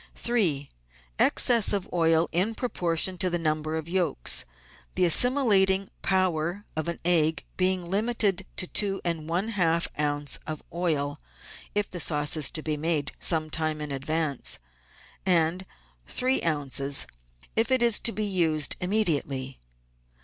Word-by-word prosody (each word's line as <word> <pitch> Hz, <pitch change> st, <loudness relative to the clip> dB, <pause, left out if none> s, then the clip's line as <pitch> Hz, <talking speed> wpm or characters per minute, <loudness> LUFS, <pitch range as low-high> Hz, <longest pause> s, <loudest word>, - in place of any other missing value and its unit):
3. 175 Hz, -, 0 dB, 0.5 s
Excess 235 Hz, -4 st, +4 dB
of 200 Hz, -3 st, -1 dB
oil 165 Hz, -1 st, +3 dB
in 195 Hz, +7 st, 0 dB
proportion 180 Hz, -6 st, 0 dB
to 185 Hz, -, +1 dB
the 175 Hz, -, 0 dB
number 155 Hz, -1 st, -2 dB
of 160 Hz, 0 st, -4 dB
yolks, 170 Hz, -, 0 dB, 0.5 s
the 180 Hz, -, +3 dB
assimilating 195 Hz, -, +3 dB
power 185 Hz, 0 st, 0 dB
of 155 Hz, +1 st, -3 dB
an 170 Hz, -, -3 dB
egg 160 Hz, -3 st, +2 dB
being 185 Hz, -1 st, +1 dB
limited 200 Hz, -1 st, 0 dB
to -, -, 0 dB
two 195 Hz, +1 st, 0 dB
and 165 Hz, -2 st, -2 dB
one 180 Hz, +6 st, -1 dB
half 170 Hz, -5 st, +1 dB
oz. 145 Hz, -1 st, -1 dB
of 155 Hz, -1 st, -5 dB
oil 155 Hz, -5 st, -1 dB, 0.5 s
(if 205 Hz, -1 st, +1 dB
the 180 Hz, -, -5 dB
sauce 150 Hz, -1 st, +2 dB
be 155 Hz, -1 st, -3 dB
made 150 Hz, -2 st, -1 dB
some 155 Hz, -2 st, 0 dB
time 155 Hz, -1 st, -1 dB
in 150 Hz, -1 st, -5 dB
advance), 145 Hz, 0 st, 0 dB, 0.7 s
and 180 Hz, +1 st, +1 dB, 0.4 s
three 260 Hz, -, +1 dB
oz. 140 Hz, -3 st, 0 dB, 0.5 s
if 225 Hz, 0 st, +2 dB
it 260 Hz, -2 st, +3 dB
is 235 Hz, -3 st, +4 dB
to 230 Hz, -, +2 dB
be 215 Hz, -1 st, -2 dB
used 165 Hz, -6 st, +1 dB
immediately. 145 Hz, -9 st, -1 dB
170 Hz, 135 wpm, -26 LUFS, 155-190 Hz, 0.7 s, Excess